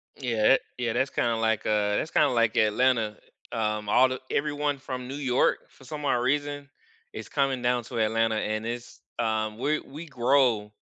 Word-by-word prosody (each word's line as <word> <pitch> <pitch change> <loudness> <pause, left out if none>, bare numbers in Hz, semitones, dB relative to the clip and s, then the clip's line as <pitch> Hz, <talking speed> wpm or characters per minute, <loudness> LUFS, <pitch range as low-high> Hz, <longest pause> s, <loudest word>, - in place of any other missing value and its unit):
Yeah 120 -3 +2
it - - +2 0.2
yeah, 120 -2 -1
that's 130 +2 +1
kinda 115 -1 0
like 110 -1 0
uh, 105 -1 +1
that's 160 - -3
kinda - - +4
like 115 -2 +2
Atlanta. 110 0 +2 0.3
Um, 105 -2 -2
all 130 +3 +5
the 130 - -4
everyone 145 -1 0
from 130 -1 -6
New 135 - -6
York, 130 -3 +1
for - - -20
some 150 0 -6
odd 135 - +2
reason, 145 +3 -1 0.4
is - - -8
coming 135 -3 0
down 120 0 +1
to 120 -3 -5
Atlanta, 110 0 +1
and 110 +1 -2
it's 120 0 -6 0.2
um, 110 -1 -1
we 150 +4 0
we 150 +5 -10
grow 125 -6 +2
120 Hz, 185 wpm, -27 LUFS, 110-135 Hz, 0.4 s, all